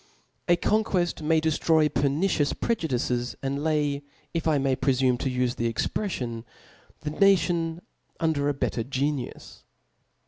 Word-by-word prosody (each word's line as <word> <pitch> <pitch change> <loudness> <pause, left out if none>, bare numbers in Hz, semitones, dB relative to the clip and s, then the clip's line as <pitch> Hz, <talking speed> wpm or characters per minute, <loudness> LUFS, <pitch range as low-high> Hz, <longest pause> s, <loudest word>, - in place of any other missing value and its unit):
A 175 - +5
conquett 185 -2 +1
ipay 160 +1 +3
dcftroy 160 0 +3
peitiicioqs 145 +3 +1
prejudices, 125 - -1
and' 140 +2 -2
lay, 150 -2 +1 0.3
if 165 -1 -1
I 155 -2 +3
may 135 -1 +1
prefumc 130 -2 +2
to 135 - -1
iife 125 -1 -1
fhe 115 0 0
expreffioni 120 - -2 0.6
the 150 - -3
nation 170 -2 +2 0.4
under 150 -3 +1
a - - +1
better 120 -3 -1
genius. 135 +1 -3
145 Hz, 130 wpm, -26 LUFS, 130-165 Hz, 0.6 s, A